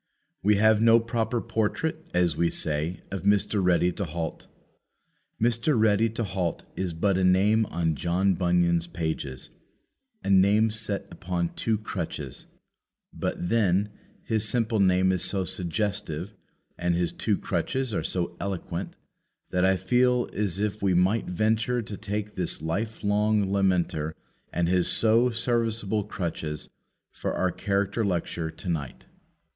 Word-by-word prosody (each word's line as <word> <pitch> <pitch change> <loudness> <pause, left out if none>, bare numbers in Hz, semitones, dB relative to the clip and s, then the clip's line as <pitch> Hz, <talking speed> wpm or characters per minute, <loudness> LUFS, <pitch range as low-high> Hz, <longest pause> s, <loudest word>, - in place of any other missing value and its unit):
We 105 +2 +4
have 110 +1 +4
no 115 0 +6
proper 115 +1 -1
portrait, 115 +9 -2
as 90 -3 +2
we 85 +1 +2
say, 80 +4 0
of 95 - -3
Mr. 100 0 +2
Ready 90 0 +3
to 100 - -4
halt. 80 0 -5 0.9
Mr. 120 +3 +2
Ready 110 +1 +3
to 115 +2 -3
halt 90 -4 -2
is 95 -2 -2
but 95 +3 +1
a - - +1
name 100 +4 +4
on 80 -1 0
John 90 +5 +1
Bunyan's 85 -1 +2
pages 80 -6 -4 0.7
a - - -3
name 100 +3 +5
set 110 -2 0
upon 85 0 -2
two 110 -1 0
crutches; 80 - -6 0.7
but, 90 - -3
then, 105 -2 +2 0.3
his 110 -2 0
simple 115 -2 +1
name 95 -1 +4
is 90 -2 +1
so 95 -2 +1
suggestive 95 0 -2 0.5
and 85 0 +1
his 85 0 0
two - - 0
crutches 130 -3 -2
are 80 - -1
so 85 +1 -2
eloquent, 100 -3 -4 0.6
that 90 0 +1
I 95 0 +4
feel 125 +6 +2
as 100 -3 -1
if 105 0 -2
we 95 -2 +2
might 95 +5 +2
venture 110 +6 0
to 105 - -7
take 105 +1 -4
this 90 -2 -2
life 110 +8 -3
long 105 -1 +2
lameter 90 -5 +1 0.4
and 85 0 0
his 90 0 +3
so 115 +2 +4
serviceable 115 -3 0
crutches 80 -6 -4 0.4
for - - -3
our 95 -1 +1
character 100 +3 -1
lecture 85 -4 -2
to 85 - -10
night. 75 -7 -3
100 Hz, 145 wpm, -26 LUFS, 85-110 Hz, 0.9 s, no